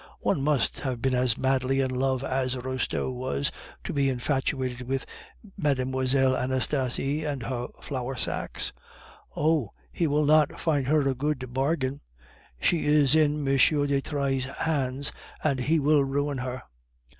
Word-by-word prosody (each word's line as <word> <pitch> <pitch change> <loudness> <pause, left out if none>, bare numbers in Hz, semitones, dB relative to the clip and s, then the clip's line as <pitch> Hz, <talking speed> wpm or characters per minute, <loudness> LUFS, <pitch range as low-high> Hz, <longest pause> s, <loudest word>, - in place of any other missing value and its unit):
One - - +1
must 145 -1 +1
have 130 -4 -3
been 130 +2 0
as 125 -2 +2
madly 130 0 +1
in 130 -1 +1
love 130 0 0
as 130 -1 0
Restaud 130 0 -2
was, 125 - -2 0.3
to - - -4
be 140 -2 +2
infatuated 130 -1 -1
with 135 0 -1 0.5
Mlle. 130 -3 +2
Anastasie 130 +3 0
and 145 -5 -3
her 125 0 -3 0.2
flour 130 -1 -3
sacks. - - -3 0.6
Oh! 150 -7 +1 0.2
he 170 - 0
will 150 +1 +2
not 150 0 +4
find 145 -5 +1
her 150 -1 +3
a 135 - +2
good 130 -2 -3
bargain! 135 0 0 0.6
She 165 - +1
is 150 -2 +4
in 150 -2 +2
M. 135 - +3
de 140 0 +3
Trailles' 135 -3 -1
hands, 140 -3 -1 0.3
and 140 -4 +1
he 150 +6 +2
will 145 0 +4
ruin 140 0 -1
her." 125 0 -4
135 Hz, 145 wpm, -27 LUFS, 130-145 Hz, 0.6 s, not